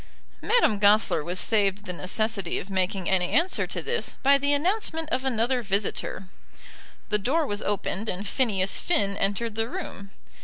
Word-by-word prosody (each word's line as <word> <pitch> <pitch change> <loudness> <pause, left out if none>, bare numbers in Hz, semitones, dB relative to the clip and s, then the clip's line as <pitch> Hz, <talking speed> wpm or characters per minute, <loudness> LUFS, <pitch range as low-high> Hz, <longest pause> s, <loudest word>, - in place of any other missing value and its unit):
Madame 210 - +3
Goesler 205 -5 +4
was 180 +3 -2
saved 205 -2 +1
the 180 - -4
necessity 195 +1 -2
of 195 - -6
making 190 0 -1
any 180 -2 +2
answer 335 +5 +1
to - - -5
this 470 0 -2
by 275 +1 +6
the 285 +1 +1
announcement 325 +1 0
of 255 +1 -1
another 250 0 +1
visitor. 200 -2 -2 0.8
The 210 -1 +2
door 300 +10 +1
was 205 -4 -2
opened, 205 +1 -2
and 195 +3 -3
Phineas 200 -5 0
Finn 200 - +1
entered 205 +4 -1
the 225 +1 -2
room. 325 - -7
210 Hz, 160 wpm, -26 LUFS, 195-265 Hz, 0.8 s, by